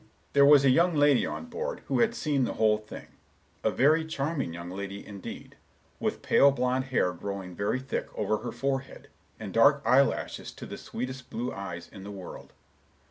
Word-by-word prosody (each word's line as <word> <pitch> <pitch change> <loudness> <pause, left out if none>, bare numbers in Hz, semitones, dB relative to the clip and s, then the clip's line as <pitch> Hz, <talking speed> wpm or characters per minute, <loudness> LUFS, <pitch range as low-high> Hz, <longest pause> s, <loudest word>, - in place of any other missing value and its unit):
"There 140 0 +6
was 145 -1 +7
a 130 - +6
young 170 +5 +3
lady 145 -3 +4
on - - -5
board, 475 - -5
who - - 0
had 235 0 +2
seen 145 - 0
the - - -1
whole 105 -1 +3
thing—a 110 - -8
very 155 +5 +3
charming 150 - -2
young 85 +1 -7
lady 100 +1 -6
indeed, 100 -2 -9 0.4
with - - -2
pale 140 - +6
blond 130 -1 0
hair 120 -9 +1
growing 95 0 -6
very 105 +7 -1
thick 130 0 -3
over 110 0 +1
her 120 - -5
forehead, 135 -1 -3 0.3
and 105 -3 -7
dark 140 +5 +5
eyelashes 135 +2 +2
to - - -9
the - - -8
sweetest 130 +2 -6
blue 120 +2 -3
eyes 95 -4 -6
in 95 - -12
the 100 - -8
world. 95 -3 -9
130 Hz, 180 wpm, -28 LUFS, 100-140 Hz, 0.4 s, was